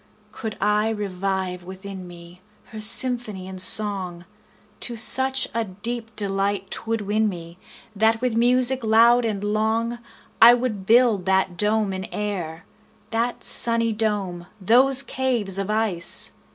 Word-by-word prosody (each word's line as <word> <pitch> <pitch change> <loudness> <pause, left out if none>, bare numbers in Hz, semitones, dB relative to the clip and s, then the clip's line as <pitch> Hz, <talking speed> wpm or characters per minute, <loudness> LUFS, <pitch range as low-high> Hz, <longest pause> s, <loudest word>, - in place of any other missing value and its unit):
Could 220 -4 -7
I 210 +2 +1
revive 190 -3 -3
within 190 0 -9
me, 175 +1 -14 0.3
Her 220 - -8
symphony 220 -3 +2
and 190 -1 -5
song, 185 -4 +2 0.5
To 240 - -4
such 260 +4 0
a 230 0 -1
deep 225 +3 -6
delight 200 0 -2
'twould 225 -1 -2
win 210 +2 0
me, 170 -1 -9 0.4
That 220 +2 +2
with 250 -2 -1
music 250 +2 +2
loud 230 +2 +4
and 205 -3 -3
long, 220 +2 0
45 235 - -25 0.4
I 235 +1 +10
would 230 -6 -4
build 230 -5 +4
that 190 -1 +1
dome 210 +1 0
in 190 0 -5
air, 180 -6 -5 0.5
That 230 +2 -2
sunny 230 -1 +3
dome! 200 -5 -2
those 255 +7 +3
caves 240 -8 -2
of 195 0 -3
ice! 215 -6 +1
215 Hz, 140 wpm, -22 LUFS, 190-230 Hz, 0.5 s, I